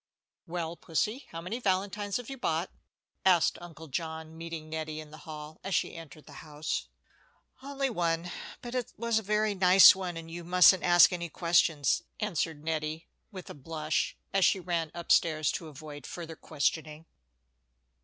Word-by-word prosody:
"Well, 170 Hz, -1 st, -3 dB
Pussie, 210 Hz, -, -2 dB
how 165 Hz, -, -7 dB
many 195 Hz, +8 st, -4 dB
valentines 200 Hz, -1 st, -1 dB
have 245 Hz, -2 st, -8 dB
you 270 Hz, -, -6 dB
bought?" 170 Hz, -8 st, -1 dB, 0.5 s
asked 180 Hz, -3 st, +4 dB
Uncle 165 Hz, -2 st, -10 dB
John, 160 Hz, +2 st, -5 dB
meeting 165 Hz, -1 st, -7 dB
Nettie 155 Hz, -1 st, -4 dB
in 155 Hz, -1 st, -10 dB
the 155 Hz, -, -13 dB
hall 150 Hz, 0 st, -8 dB
as 195 Hz, 0 st, -1 dB
she -, -, 0 dB
entered 160 Hz, -2 st, -11 dB
the -, -, -11 dB
house. 150 Hz, 0 st, -4 dB, 0.7 s
"Only 275 Hz, 0 st, -2 dB
one; 170 Hz, -3 st, -1 dB, 0.3 s
but 240 Hz, 0 st, -6 dB
it 250 Hz, -2 st, -3 dB
was 230 Hz, 0 st, +1 dB
a -, -, -6 dB
very 210 Hz, +1 st, +1 dB
nice 185 Hz, 0 st, +8 dB
one, 180 Hz, -3 st, -4 dB
and 165 Hz, 0 st, -8 dB
you 170 Hz, +1 st, -6 dB
mustn't 180 Hz, +1 st, +6 dB
ask 175 Hz, +1 st, +6 dB
any 170 Hz, -1 st, -4 dB
questions," 160 Hz, -5 st, +2 dB, 0.2 s
answered 165 Hz, -7 st, -2 dB
Nettie, 155 Hz, 0 st, -3 dB, 0.2 s
with 185 Hz, -3 st, -9 dB
a -, -, -7 dB
blush, 155 Hz, +2 st, -2 dB, 0.2 s
as 195 Hz, -1 st, +3 dB
she 190 Hz, -, +4 dB
ran 170 Hz, -3 st, -2 dB
up 170 Hz, 0 st, -4 dB
stairs 155 Hz, -3 st, +3 dB
to 165 Hz, -, -5 dB
avoid 145 Hz, -1 st, -10 dB
further 165 Hz, -2 st, -7 dB
questioning. 155 Hz, +1 st, -2 dB
165 Hz, 165 wpm, -30 LUFS, 155-190 Hz, 0.7 s, nice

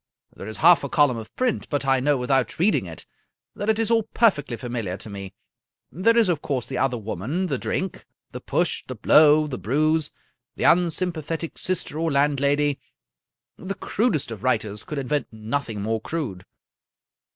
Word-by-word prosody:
There 95 Hz, -, -8 dB
is 110 Hz, -, -7 dB
half 170 Hz, +2 st, +6 dB
a -, -, -3 dB
column 145 Hz, -6 st, +3 dB
of 110 Hz, -1 st, -8 dB
print, 255 Hz, -3 st, -1 dB
but 145 Hz, -2 st, -1 dB
I 135 Hz, -1 st, +3 dB
know 145 Hz, +2 st, +2 dB
without 130 Hz, +2 st, 0 dB
reading 195 Hz, +6 st, +2 dB
it -, -, -9 dB, 0.5 s
that 205 Hz, -, -3 dB
it 220 Hz, -, +3 dB
is 225 Hz, 0 st, 0 dB
all 230 Hz, -1 st, +4 dB
perfectly 195 Hz, -, +1 dB
familiar 115 Hz, -7 st, -4 dB
to 105 Hz, -, -10 dB
me. 100 Hz, -2 st, -8 dB, 0.6 s
There 230 Hz, +7 st, +2 dB
is, 230 Hz, -3 st, +5 dB
of 170 Hz, -5 st, 0 dB
course, 130 Hz, -5 st, -2 dB
the 125 Hz, 0 st, -4 dB
other 130 Hz, -2 st, +1 dB
woman, 115 Hz, -, -3 dB
the 140 Hz, -8 st, -2 dB
drink, 190 Hz, -1 st, -3 dB, 0.2 s
the -, -, -7 dB
push, -, -, -1 dB
the -, -, -5 dB
blow, 155 Hz, 0 st, +5 dB
the 140 Hz, -4 st, -5 dB
bruise, 155 Hz, +5 st, +1 dB, 0.4 s
the -, -, -4 dB
unsympathetic 165 Hz, -2 st, +1 dB
sister 185 Hz, -4 st, -2 dB
or 165 Hz, -1 st, 0 dB
landlady. 140 Hz, 0 st, +2 dB, 0.8 s
The 195 Hz, +2 st, -5 dB
crudest 190 Hz, -, -1 dB
of 110 Hz, -3 st, -8 dB
writers 110 Hz, -5 st, 0 dB
could 150 Hz, -, -6 dB
invent 140 Hz, 0 st, -1 dB
nothing 110 Hz, -1 st, -3 dB
more 110 Hz, +1 st, -1 dB
crude." 110 Hz, -, -5 dB
145 Hz, 175 wpm, -24 LUFS, 120-170 Hz, 0.8 s, half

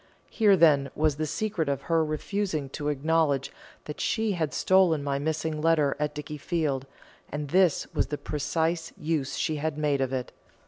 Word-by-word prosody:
Here, 205 Hz, -4 st, +4 dB
then, 145 Hz, -5 st, +5 dB
was 155 Hz, -2 st, +1 dB
the 155 Hz, 0 st, -1 dB
secret 180 Hz, -2 st, -2 dB
of 140 Hz, -, -2 dB
her 165 Hz, -1 st, +2 dB
refusing 155 Hz, -1 st, -2 dB
to 145 Hz, +2 st, -5 dB
acknowledge 145 Hz, -1 st, +1 dB, 0.3 s
that 150 Hz, -, -6 dB
she 220 Hz, -1 st, 0 dB
had 160 Hz, -6 st, -1 dB
stolen 180 Hz, -6 st, +3 dB
my 140 Hz, -1 st, -1 dB
missing 155 Hz, +1 st, -2 dB
letter 155 Hz, -3 st, +3 dB
at 150 Hz, 0 st, -2 dB
Dickiefield, 150 Hz, -2 st, -2 dB, 0.4 s
and 150 Hz, 0 st, -4 dB
this 180 Hz, -1 st, +3 dB
was -, -, +1 dB
the 150 Hz, -, -3 dB
precious 160 Hz, +3 st, -2 dB
use 155 Hz, -4 st, -2 dB
she 155 Hz, -3 st, -1 dB
had 150 Hz, 0 st, -2 dB
made 145 Hz, -2 st, +1 dB
of 130 Hz, -1 st, 0 dB
it. 130 Hz, -2 st, -3 dB
155 Hz, 170 wpm, -27 LUFS, 145-165 Hz, 0.4 s, then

